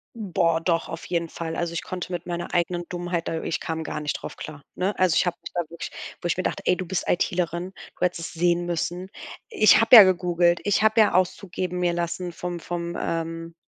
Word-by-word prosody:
Boah, 170 -6 +1
doch, 165 -1 0
auf 165 - -7
jeden 170 -1 -1
Fall. 165 0 -5
Also 170 0 -2
ich 170 - -3
konnte 185 0 -5
mit 175 -1 -4
meiner 175 -1 -4
eigenen 175 0 0
Dummheit 175 -1 -3
da 160 - -2
ich - - -2
kam 160 0 -3
gar 150 - -4
nicht 150 -1 -2
drauf - - -7
klar, 145 -2 -9
ne? 190 +2 -1
Also 185 -3 +3
ich - - +3
habe 175 -1 -1
mich - - -8
da 175 - 0
wirklich 170 - -7 0.3
wo - - -11
ich 175 - 0
mir 185 - -1
dachte: - - -2
„Ey, - - +4
du 185 - -5
bist 185 +1 -3
IT-lerin. 175 +1 -1 0.2
Du - - 0
hättest 170 -2 -3
sehen 175 +1 +1
müssen.“ 175 +2 -3 0.4
Ich 215 - +6
habe 225 +2 +7
ja 220 - +13
gegoogelt, 175 -2 +2
ich 205 0 +2
habe 220 +1 +4
ja 215 - +5
Auszug 185 +1 0
geben 180 0 -3
mir 175 -1 +1
lassen 175 +1 -3
vom 175 +1 -5
vom, 170 0 -4
ähm, 165 0 -3
175 Hz, 230 wpm, -25 LUFS, 170-180 Hz, 0.4 s, ja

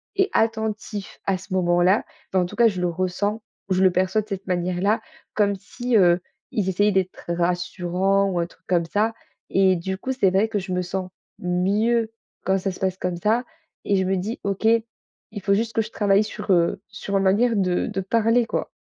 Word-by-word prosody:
et 390 0 +2
attentifs 220 -2 -1
à 195 -1 +1
ce 190 0 -9
moment-là. 175 +2 +3 0.3
Enfin, 185 -1 +3
en - - -1
tout 175 - -8
cas 235 -1 +5
je 195 -5 -1
le 180 - +1
ressens, 185 +5 -1 0.3
je 185 0 +2
le 190 - +7
perçois 185 +4 +1
de 215 - -14
cette 195 -1 -4
manière-là 180 +3 0 0.3
comme 205 -1 +2
si, 240 +5 -1
heu, 175 -3 +5 0.3
ils 195 -3 0
essayaient 205 +3 +2
d'être 190 -1 -1
rassurants 180 +2 +1
ou 175 - -1
un 170 - +1
truc 170 - -19
comme 175 -2 +2
ça 215 +6 0 0.4
et 190 -1 +4
du 190 +2 -3
coup 260 - -4
c'est 200 -7 +3
vrai 195 +4 +2
que 215 -2 -1
je 185 - -6
me 180 0 0
sens 185 0 -4 0.3
mieux 210 +6 +1 0.3
quand 190 0 +2
ça 195 +1 -2
se 185 - -11
passe 190 -1 -1
comme 180 -2 -2
ça 220 +7 +1 0.4
et 200 - +1
je 190 - +1
me 190 +1 +1
dis: 205 +6 -3
«OK, 200 +2 -1 0.7
il 205 - -4
faut 200 +1 +2
juste 225 +2 -1
que 225 - +2
je 215 - -5
travaille 200 0 +3
sur, 210 -1 -4
heu, 170 +2 +2
sur 200 - -5
ma - - +4
manière 215 +5 +3
de 180 -3 +1
de 195 - -2
parler 230 +4 +2
quoi.» - - -3
195 Hz, 210 wpm, -23 LUFS, 180-215 Hz, 0.7 s, le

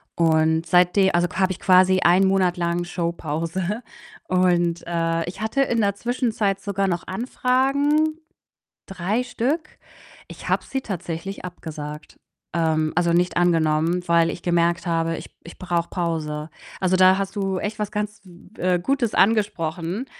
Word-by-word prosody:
Und 160 0 +2
seitde 180 +2 +4
also, 175 0 +3
habe 190 0 +2
ich 180 - -5
quasi 185 0 +5
1 185 +3 +5
Monat 185 -2 +2
lang 170 0 -1
Showpause 170 +4 -3 0.5
und, 175 -2 +2
äh, 165 -1 -1
ich 190 +4 -7
hatte 220 +5 0
in 230 -4 0
der 200 -1 +1
Zwischenzeit 220 -4 -1
sogar 195 -1 -1
noch 175 -2 -2
Anfragen, 275 +8 +1 0.7
3 195 +6 -2
Stück. 275 +6 -3 0.5
Ich - - -9
habe - - +1
sie 265 0 -3
tatsächlich 185 -1 -5
abgesagt, 150 -3 -8 0.4
ähm 160 -2 +1
also, 175 0 +2
nicht 180 +1 +1
angenommen, 165 0 +2
weil 170 0 +4
ich 175 - -6
gemerkt 170 0 +1
habe: 165 0 0
„Ich - - -9
ich 170 - -12
brauche 175 -2 -1
Pause.“ 160 -3 -3 0.3
Also, 185 0 +2
da 185 0 +6
hast 195 +1 -3
du 195 -2 -1
echt 215 +1 -4
was 210 0 -2
ganz, 210 0 -4 0.4
äh, 180 -1 +1
Gutes 250 +2 0
angesprochen, 195 -1 +1
180 Hz, 145 wpm, -23 LUFS, 170-205 Hz, 0.7 s, da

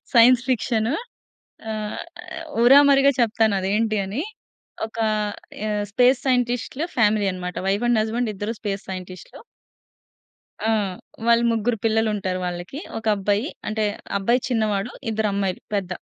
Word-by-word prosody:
Science 240 +1 +7
fiction. 235 +1 +1 0.8
ఆహ్, 215 -1 -4 0.2
ఆహ్, 330 -2 -7 0.2
ఊరామరిగా 280 +1 +7
చెప్తాను 220 -2 +2
అది 190 - -2
ఏంటి 220 -1 +1
అని. 225 - -3 0.6
ఒక 225 - -12 0.7
ఆహ్, 210 -1 -1
స్పేస్ 250 +3 +4
సైంటిస్ట్‌లు 245 +3 0
ఫ్యామిలీ 210 -2 +3
అన్నమాట. 180 -1 -5
వైఫ్ 200 +5 +1
అండ్ 230 -2 +4
హస్బాండ్ 225 +1 -1
ఇద్దరు 205 +4 -3
స్పేస్ 200 -2 -3
సైంటిస్ట్‌లు. 185 -1 -8 1.3
ఆ! - - +4 0.6
వాళ్ళు 235 0 +5
ముగ్గురు 225 +1 0
పిల్లలుంటారు 215 -4 +1
వాళ్ళకి. 175 +10 -5 0.2
ఒక 225 - -11
అబ్బాయి, 205 +5 0 0.2
అంటే 215 0 0 0.3
అబ్బాయి 235 +6 +2
చిన్నవాడు. 215 -1 0 0.2
ఇద్దరు 215 -1 0
అమ్మాయిలు 195 -2 -1
పెద్ద. 190 -2 -1
220 Hz, 125 wpm, -23 LUFS, 200-240 Hz, 1.3 s, Science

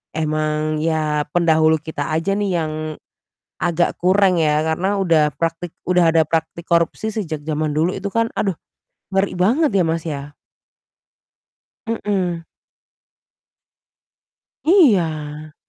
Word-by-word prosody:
emang 155 0 -1
ya 155 -2 0
pendahulu 160 -2 +3
kita 155 -1 -5
aja 165 +5 0
nih 200 -1 -1
yang 155 -1 -3 0.9
agak 175 0 +1
kurang 185 -1 +3
ya 150 -1 +2
karena 175 +6 0
udah 165 -6 +3
praktik 165 +1 -3
udah 175 -2 +3
ada 160 - +6
praktik 165 +2 -2
korupsi 170 +6 0
sejak 165 -9 -4
zaman 155 -1 -1
dulu 160 +4 +2
itu 195 +1 -4
kan. 230 +2 0
Aduh 195 -4 -1 0.6
ngeri 195 0 +1
banget 245 - +2
ya, 195 -2 +2
Mas, 165 0 -1
ya. 145 -2 -6 1.5
Mhm. 190 -7 -2 2.2
Iya. 160 - +2
165 Hz, 115 wpm, -20 LUFS, 155-190 Hz, 2.2 s, ada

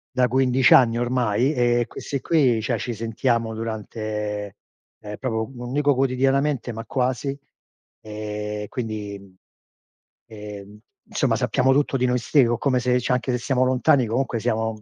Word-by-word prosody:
da 125 -1 +3
15 130 0 +3
anni 120 -3 +6
ormai 125 +2 +1
e 120 -1 +2
questi 140 - -5
qui, 130 -9 +2
cioè 115 -2 -1
ci 120 - -3
sentiamo 115 +1 -1
durante, 105 -2 -4 0.5
ehm 105 -1 -7
proprio, 110 -2 -3
non 120 -1 -7
dico 145 +1 +2
quotidianamente, 135 0 +1
ma 115 - -6
quasi. 130 +2 -2 0.6
Ehm 105 0 -5
quindi, 105 -4 -5
mhmm, 95 -1 -18 1.0
ehm, 105 0 -10 0.3
somma 140 - +1
sappiamo 125 +2 +1
tutto 145 -1 +1
di 125 - +1
noi 125 - +1
ste 130 +1 +3
o 120 0 0
come 130 -1 +1
se 125 0 +1
cioé 125 +1 0
anche 125 +1 -1
se - - +1
siamo 125 +1 0
lontani, 130 -1 +3
comunque 120 0 -1
siamo, 110 -1 -2
120 Hz, 155 wpm, -23 LUFS, 110-130 Hz, 1.0 s, anni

